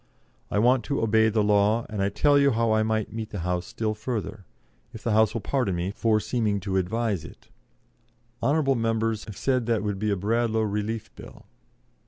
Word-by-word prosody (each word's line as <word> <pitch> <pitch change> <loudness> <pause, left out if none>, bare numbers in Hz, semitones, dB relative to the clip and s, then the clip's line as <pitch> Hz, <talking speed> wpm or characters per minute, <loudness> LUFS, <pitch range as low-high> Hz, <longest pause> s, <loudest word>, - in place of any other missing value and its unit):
I - - -1
want 125 +3 +3
to 140 - -1
obey 110 0 +3
the 110 -1 +1
law, 105 +2 +2
and 105 -2 -4
I 100 - +2
tell 145 +8 +3
you 140 0 +4
how 115 -2 +1
I 110 0 +3
might 110 -1 -1
meet 110 -1 -5
the 100 - -5
House 90 0 -2
still 110 -1 -2
further, 110 -2 -5 0.5
if 110 - -9
the 115 - 0
House 110 0 +3
will 115 - -2
pardon 125 -9 -1
me 85 +3 -2
for 110 +1 +1
seeming 105 -3 -1
to 95 +1 -1
advise 100 0 -1
it. - - -14 0.9
Hon. 155 +3 +2 0.2
members 115 -1 0
have 105 - -9
said 130 -3 0
that 115 -3 +1
would 105 -2 -2
be 105 +1 -1
a 100 - 0
Bradlaugh 110 +3 0
Relief 105 +1 -3
Bill. - - -13
110 Hz, 200 wpm, -26 LUFS, 105-115 Hz, 0.9 s, you